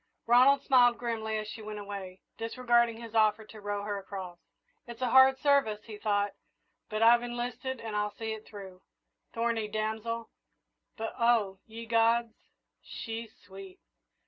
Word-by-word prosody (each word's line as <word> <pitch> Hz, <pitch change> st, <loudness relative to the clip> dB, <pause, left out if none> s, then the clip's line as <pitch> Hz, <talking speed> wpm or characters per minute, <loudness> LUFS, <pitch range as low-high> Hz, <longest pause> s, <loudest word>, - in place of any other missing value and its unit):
Ronald 260 Hz, +4 st, +5 dB
smiled 245 Hz, -4 st, +5 dB
grimly 220 Hz, -2 st, -2 dB
as 215 Hz, 0 st, -4 dB
she 220 Hz, -, -8 dB
went 215 Hz, 0 st, -7 dB
away, 200 Hz, -2 st, -7 dB
disregarding 235 Hz, 0 st, +1 dB
his 230 Hz, -1 st, -10 dB
offer 215 Hz, -1 st, +3 dB
to 215 Hz, 0 st, -13 dB
row 205 Hz, 0 st, -3 dB
her 205 Hz, -1 st, -3 dB
across. 190 Hz, -3 st, -8 dB, 0.5 s
"It's 235 Hz, +1 st, -7 dB
a 245 Hz, -, 0 dB
hard 265 Hz, 0 st, +7 dB
service," 265 Hz, -7 st, +2 dB
he 215 Hz, -2 st, -10 dB
thought, 205 Hz, -1 st, 0 dB, 0.6 s
"but 215 Hz, +1 st, 0 dB
I've 235 Hz, +1 st, +7 dB
enlisted 245 Hz, +1 st, -4 dB
and 220 Hz, -2 st, -6 dB
I'll 210 Hz, 0 st, -1 dB
see 220 Hz, 0 st, -4 dB
it 220 Hz, 0 st, -8 dB
through. 190 Hz, -3 st, -11 dB, 0.5 s
Thorny 230 Hz, -1 st, -1 dB
damsel; 220 Hz, +2 st, -3 dB, 0.7 s
but 225 Hz, -1 st, -4 dB
oh, 225 Hz, -5 st, +2 dB
ye 230 Hz, +1 st, -8 dB
gods, 230 Hz, 0 st, +2 dB, 0.5 s
she's 225 Hz, 0 st, -7 dB
sweet!" 190 Hz, 0 st, -12 dB
225 Hz, 150 wpm, -30 LUFS, 210-235 Hz, 0.7 s, hard